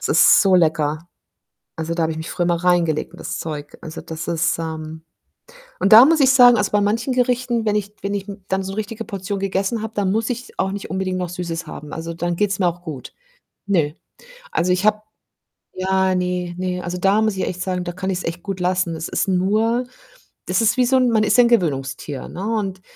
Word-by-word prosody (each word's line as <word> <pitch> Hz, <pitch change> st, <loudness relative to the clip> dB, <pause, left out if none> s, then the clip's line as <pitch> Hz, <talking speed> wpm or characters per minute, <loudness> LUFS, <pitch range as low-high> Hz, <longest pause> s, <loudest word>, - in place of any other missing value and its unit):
Es -, -, -3 dB
ist -, -, +6 dB
so 190 Hz, -2 st, +4 dB
lecker. 155 Hz, -1 st, +1 dB, 0.7 s
Also, 165 Hz, +1 st, -3 dB
da 170 Hz, -, 0 dB
habe 160 Hz, -, 0 dB
ich 155 Hz, -, -5 dB
mich 160 Hz, -, -6 dB
früher 175 Hz, -, -1 dB
immer 170 Hz, 0 st, 0 dB
reingelegt 170 Hz, -4 st, +1 dB
in -, -, -13 dB
das -, -, -5 dB
Zeug. 150 Hz, -2 st, -6 dB
Also, 160 Hz, -, -8 dB
das 160 Hz, 0 st, -7 dB
ist, 165 Hz, 0 st, 0 dB
ähm 160 Hz, -1 st, -6 dB, 0.8 s
und 195 Hz, -, +2 dB
da 230 Hz, +4 st, +11 dB
muss 315 Hz, 0 st, +3 dB
ich 265 Hz, -, +6 dB
sagen 245 Hz, -3 st, +7 dB
also, 205 Hz, -2 st, 0 dB
bei 210 Hz, -, +3 dB
manchen 225 Hz, +5 st, 0 dB
Gerichten, 250 Hz, -2 st, 0 dB
wenn 210 Hz, -, +2 dB
ich 205 Hz, 0 st, -3 dB
wenn 200 Hz, +1 st, -2 dB
ich, 200 Hz, 0 st, -3 dB
hm, 200 Hz, -1 st, -9 dB
dann 190 Hz, 0 st, 0 dB
so 190 Hz, 0 st, -5 dB
'ne -, -, -6 dB
richtige 225 Hz, +1 st, -4 dB
Portion 200 Hz, 0 st, -4 dB
gegessen 195 Hz, +3 st, -1 dB
habe, 220 Hz, 0 st, -5 dB
dann 195 Hz, -2 st, +1 dB
muss 220 Hz, +2 st, 0 dB
ich 245 Hz, +1 st, -6 dB
auch 190 Hz, 0 st, 0 dB
nicht 200 Hz, 0 st, -6 dB
unbedingt 190 Hz, -1 st, -2 dB
noch 180 Hz, -1 st, -2 dB
Süßes 175 Hz, -1 st, -5 dB
haben. 150 Hz, 0 st, -9 dB
Also, 165 Hz, +1 st, -5 dB
dann 175 Hz, +1 st, -2 dB
geht's 200 Hz, 0 st, 0 dB
mir 180 Hz, -, +4 dB
auch 175 Hz, +1 st, -5 dB
gut. 150 Hz, -7 st, -8 dB, 0.5 s
Nö. 175 Hz, -7 st, +2 dB, 0.6 s
Also, 175 Hz, +2 st, 0 dB
ich 185 Hz, +2 st, 0 dB
habe 215 Hz, 0 st, +3 dB, 0.7 s
ja, 190 Hz, 0 st, +1 dB
ne, 180 Hz, -1 st, -2 dB
ne, 180 Hz, -1 st, -2 dB
also, 175 Hz, +1 st, -4 dB
da 195 Hz, +4 st, +3 dB
muss 215 Hz, -2 st, +1 dB
ich 190 Hz, -, -1 dB
echt 180 Hz, 0 st, -4 dB
sagen, 180 Hz, -1 st, -2 dB
da 175 Hz, -, -4 dB
kann 185 Hz, +2 st, -3 dB
ich's 185 Hz, -1 st, -3 dB
echt 170 Hz, +1 st, -4 dB
gut 195 Hz, -1 st, -5 dB
lassen. 180 Hz, -1 st, 0 dB
Es 160 Hz, 0 st, -5 dB
ist -, -, 0 dB
nur 215 Hz, +6 st, +1 dB, 0.6 s
das -, -, +1 dB
ist 225 Hz, +2 st, +2 dB
wie 250 Hz, -, +4 dB
so 260 Hz, +2 st, +3 dB
'n 255 Hz, -1 st, +3 dB
man 220 Hz, -2 st, +3 dB
ist 215 Hz, -, +2 dB
ja 245 Hz, -, +8 dB
'n -, -, +4 dB
Gewöhnungstier, 140 Hz, -, -1 dB
ne, 185 Hz, -, -7 dB
und 200 Hz, -4 st, -2 dB
185 Hz, 235 wpm, -21 LUFS, 170-210 Hz, 0.8 s, da